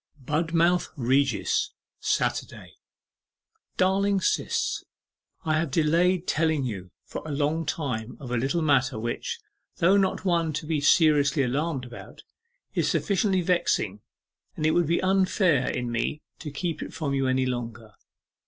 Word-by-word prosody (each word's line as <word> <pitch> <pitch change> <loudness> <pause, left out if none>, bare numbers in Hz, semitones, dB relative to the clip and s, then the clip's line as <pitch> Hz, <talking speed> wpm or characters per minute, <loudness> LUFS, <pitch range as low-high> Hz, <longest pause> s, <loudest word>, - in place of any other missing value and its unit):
'BUDMOUTH 165 +5 +1
REGIS, 130 - +1 0.3
Saturday. - - -2 1.0
'DARLING 195 +1 +2
SIS, - - 0 0.6
I 155 -1 +2
have 165 -1 -1
delayed 170 +5 +2
telling 155 -3 +1
you 95 -7 -5 0.2
for - - -6
a 155 - -7
long 150 +2 -1
time 125 -6 -3
of 130 -4 -8
a - - +1
little 135 +8 0
matter 135 -5 +2
which, 120 - -3 0.4
though 185 +3 +4
not 195 0 0
one 170 -3 +1
to 155 +2 -4
be 155 -2 -1
seriously 145 -2 +4
alarmed 135 +1 -1
about, 120 -1 -11 0.5
is - - +1
sufficiently 195 -1 +1
vexing, 135 - 0 0.5
and 155 - -2
it 155 - +4
would 175 -1 +2
be 170 +3 +1
unfair 185 - +2
in 125 -1 -2
me 120 +6 -2 0.2
to 155 - -6
keep 155 +2 -3
it - - -7
from 145 -4 -2
you 135 -1 +1
any 130 0 +2
longer. 115 -3 -5
150 Hz, 145 wpm, -26 LUFS, 130-170 Hz, 1.0 s, though